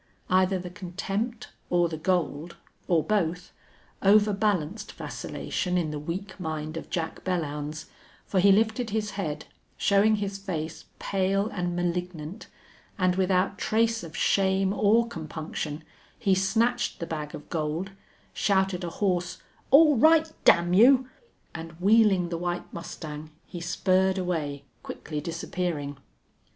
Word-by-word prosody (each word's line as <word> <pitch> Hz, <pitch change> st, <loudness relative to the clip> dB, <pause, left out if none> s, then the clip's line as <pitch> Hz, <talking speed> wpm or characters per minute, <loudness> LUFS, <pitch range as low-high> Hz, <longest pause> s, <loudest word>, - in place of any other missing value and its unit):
Either 185 Hz, +1 st, +3 dB
the 180 Hz, -1 st, -7 dB
contempt 195 Hz, +6 st, -4 dB, 0.2 s
or 175 Hz, -1 st, +3 dB
the 165 Hz, -, -5 dB
gold, 165 Hz, -1 st, -1 dB, 0.3 s
or 165 Hz, -3 st, +3 dB
both, 180 Hz, -4 st, -1 dB, 0.5 s
overbalanced 205 Hz, -1 st, +2 dB
vacillation 180 Hz, -1 st, -3 dB
in 160 Hz, -4 st, 0 dB
the 150 Hz, -, -4 dB
weak 190 Hz, +6 st, -5 dB
mind 155 Hz, -2 st, -4 dB
of 165 Hz, -, -6 dB
Jack 165 Hz, -2 st, -3 dB
Belllounds, 155 Hz, -4 st, -3 dB, 0.4 s
for 190 Hz, -, 0 dB
he 200 Hz, +2 st, +6 dB
lifted 220 Hz, +3 st, +2 dB
his 210 Hz, 0 st, -2 dB
head, 160 Hz, -7 st, -4 dB, 0.3 s
showing 205 Hz, +2 st, +4 dB
his 200 Hz, -1 st, -3 dB
face 165 Hz, -5 st, -5 dB
pale 195 Hz, +2 st, 0 dB
and 175 Hz, -2 st, -2 dB
malignant, 175 Hz, +1 st, -3 dB, 0.5 s
and 185 Hz, -1 st, +2 dB
without 190 Hz, +1 st, +1 dB
trace 225 Hz, +1 st, +1 dB
of 165 Hz, -2 st, -8 dB
shame 190 Hz, 0 st, +2 dB
or 220 Hz, +3 st, +3 dB
compunction 155 Hz, -4 st, -5 dB, 0.3 s
he 195 Hz, -4 st, +2 dB
snatched 225 Hz, +6 st, +1 dB
the 170 Hz, -, -3 dB
bag 150 Hz, -2 st, -5 dB
of 150 Hz, -, -11 dB
gold, 160 Hz, +4 st, -2 dB, 0.4 s
shouted 190 Hz, -2 st, +1 dB
a 175 Hz, -, -2 dB
hoarse, 180 Hz, -1 st, -1 dB, 0.3 s
"All 295 Hz, 0 st, +7 dB
right, 315 Hz, +4 st, +5 dB
damn 175 Hz, +1 st, +5 dB
you!" 255 Hz, +6 st, +6 dB, 0.4 s
and, 165 Hz, 0 st, -7 dB
wheeling 195 Hz, 0 st, +4 dB
the 170 Hz, -1 st, -3 dB
white 175 Hz, 0 st, -3 dB
mustang, 155 Hz, -2 st, -7 dB, 0.2 s
he 175 Hz, -, -8 dB
spurred 185 Hz, +2 st, +2 dB
away, 155 Hz, -6 st, -2 dB, 0.2 s
quickly 150 Hz, -2 st, -6 dB
disappearing. 165 Hz, -3 st, -3 dB
180 Hz, 130 wpm, -27 LUFS, 165-200 Hz, 0.5 s, All